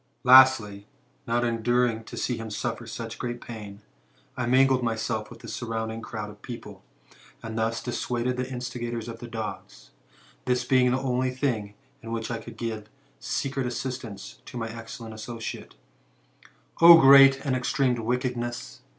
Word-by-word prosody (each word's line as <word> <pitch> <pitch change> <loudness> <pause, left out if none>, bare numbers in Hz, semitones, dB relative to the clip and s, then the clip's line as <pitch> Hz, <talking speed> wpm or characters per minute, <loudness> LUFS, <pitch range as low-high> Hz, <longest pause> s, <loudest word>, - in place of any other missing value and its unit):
'* - - -44
Lastly, 115 -7 +6 0.4
not 120 +1 +1
enduring 120 0 +1
to - - -9
see 125 - -1
him 115 -1 -6
suffer 115 +2 -4
such 115 0 -7
great 120 0 -4
pain, 105 -4 -9 0.5
I 125 -2 -2
mingled 130 +1 +4
myself 110 -2 -2
with - - -13
the - - -10
surrounding 115 -1 -4
crowd 105 -2 -6
of 105 - -17
people, 105 -5 -9 0.6
and 110 -1 -6
thus 115 0 -1
dissuaded 125 0 -2
the 125 +1 -4
instigators 120 -2 -4
of 115 -1 -7
the 120 - -8
dogs, 110 - -7 0.5
this 125 0 0
being 125 -1 +4
the 125 - +1
only 130 -1 0
thing 120 -6 -2 0.3
in 115 -2 -8
which 115 0 -3
I 115 - -3
could 115 -1 -11
give 110 -2 -5 0.3
secret 135 -2 -2
assistance 120 -5 -6
to - - -8
my 115 -1 -3
excellent 115 0 -8
associate: 115 +1 -7 1.1
O 170 0 +11
great 135 -1 +8
and 130 -2 +1
extreme 130 0 +1
wickedness 120 0 -3
120 Hz, 155 wpm, -26 LUFS, 110-125 Hz, 1.1 s, O